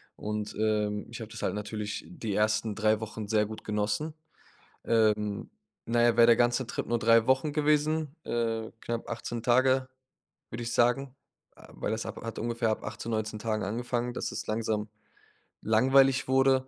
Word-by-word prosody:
Und, 105 0 -4
ähm, 105 -1 0
ich 120 - -7
habe 110 -1 -7
das 115 - -8
halt - - 0
natürlich 105 0 -4
die 120 - -5
1. 110 +1 +1
3 110 0 +2
Wochen 110 -1 -6
sehr 105 0 +2
gut 110 +1 -8
genossen. 105 +9 -1 0.7
Ähm, 105 -2 +1 0.3
na 120 0 +2
ja, 120 0 +4
wäre 115 - +8
der 115 - +7
ganze 120 +1 +2
Trip - - -4
nur 120 - +1
3 115 0 +4
Wochen 130 +3 +2
gewesen, 150 0 +1
äh, 115 -1 -2
knapp 115 -1 -4
18 120 0 -4
Tage, 130 +2 +3 0.6
würde 120 +1 -5
ich 115 - -3
sagen 125 +3 +2 0.4
äh, - - -16
weil - - -3
das 110 0 -2
ab 110 - -6
hat 115 - -5
ungefähr 115 0 0
ab - - -3
18, 115 +2 -5
19 110 -1 -2
Tagen 110 0 -1
angefangen, 120 +4 -2
dass - - -3
es - - -5
langsam 110 -1 -1 0.7
langweilig 135 +4 +4
wurde. 130 0 +3
115 Hz, 175 wpm, -29 LUFS, 110-125 Hz, 0.7 s, wäre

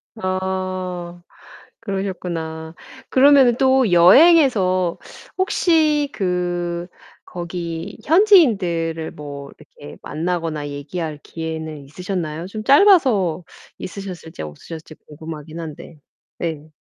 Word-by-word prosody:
아 185 -2 -4 0.6
그러셨구나. 175 -6 -5 0.4
그러면은 265 -3 +5
또 260 -5 +3
여행에서 185 - +5 0.4
혹시 315 -6 +2
그 175 -2 -2 0.4
거기 170 +1 -6
현지인들을 205 - +3
뭐 140 -1 -9
이렇게 145 - -13
만나거나 165 -3 -3
얘기할 150 +2 -5
기회는 160 -2 -6
있으셨나요? 170 +1 -5
좀 215 +2 -7
짧아서 260 - +4 0.3
있으셨을지 180 - -8
없으셨을지 155 - -9
궁금하기는 155 +1 -8
한데. 160 +1 -9 0.4
네. 160 -2 -4
175 Hz, 235 characters per minute, -20 LUFS, 160-210 Hz, 0.6 s, 그러면은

